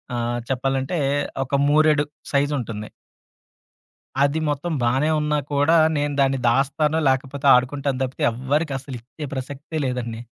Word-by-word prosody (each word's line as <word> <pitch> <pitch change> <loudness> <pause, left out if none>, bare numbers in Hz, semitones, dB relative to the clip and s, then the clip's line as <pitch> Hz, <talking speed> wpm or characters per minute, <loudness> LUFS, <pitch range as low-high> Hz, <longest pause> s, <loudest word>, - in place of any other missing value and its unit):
ఆహ్, 120 0 -1
చెప్పాలంటే, 135 +5 -1 0.5
ఒక 135 - -1
మూరెడు 150 0 +4 0.3
సైజ్ 145 +1 +2
ఉంటుంది. 105 -3 -6 1.3
అది 145 +3 +1
మొత్తం 155 +4 -2
బానే 130 +6 +2
ఉన్నా 150 0 0
కూడా, 145 +4 +3 0.2
నేను 145 0 0
దాన్ని 135 0 +2
దాస్తాను, 140 +5 +1
లాకపోతే 135 +1 -1
ఆడుకుంటాను 135 +1 0
తప్పితే 130 0 -3
ఎవ్వరికి 140 +5 -1
అసలు 135 -1 -8
ఇచ్చే 130 +6 -9
ప్రసక్తే 140 +4 -5
లేదండి. 120 -3 -3
140 Hz, 130 wpm, -22 LUFS, 130-150 Hz, 1.3 s, మూరెడు